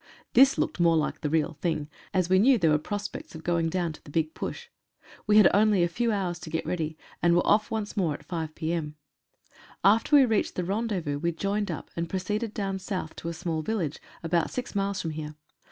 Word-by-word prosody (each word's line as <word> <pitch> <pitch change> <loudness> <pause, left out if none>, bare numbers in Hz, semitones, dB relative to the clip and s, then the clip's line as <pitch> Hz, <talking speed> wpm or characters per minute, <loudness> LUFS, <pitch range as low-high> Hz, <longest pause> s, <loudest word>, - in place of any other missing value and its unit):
This 270 +2 +6
looked - - -1
more 170 -1 +4
like 155 - -1
the 150 - -1
real 155 -1 0
thing, 160 -4 -1 0.2
as 185 -2 +1
we 185 +1 +4
knew 255 +5 +5
there 165 -6 +3
were 150 - +3
pros 205 +6 -3
pects, - - -10
of 160 - -9
going 170 -1 +1
down 170 -1 -1
to - - -15
the - - -13
big 155 +1 -1
push. 475 - -5 0.6
We 210 0 +5
had 215 - +9
only 205 -2 +4
a - - +3
few 230 +7 0
hours 185 -4 -1
to 165 - -8
get 160 +1 -2
ready, 160 -3 -2 0.2
and 170 0 +4
were 175 - +3
off 215 0 +3
once 220 -3 -3
more 170 -7 +1
at - - -12
5 160 -3 -4
p.m. 160 -2 -2 0.9
After 225 +9 +4
we 280 -2 +8
reached 220 -4 0
the 180 - -1
rendezvous 190 -7 -2
we 170 +3 0
joined 200 +5 -2
up, - - -6
and 170 0 -3
pro 190 - -1
ceeded 210 +4 -3
down 195 -2 -2
South 185 -5 -4
to 165 - -4
a - - -4
small 160 -1 -3
village, 170 -5 -2 0.2
about 165 0 +1
six 250 - -5
miles 200 -1 -1
from 165 - -3
here. 155 -1 -6
175 Hz, 230 wpm, -27 LUFS, 160-205 Hz, 0.9 s, had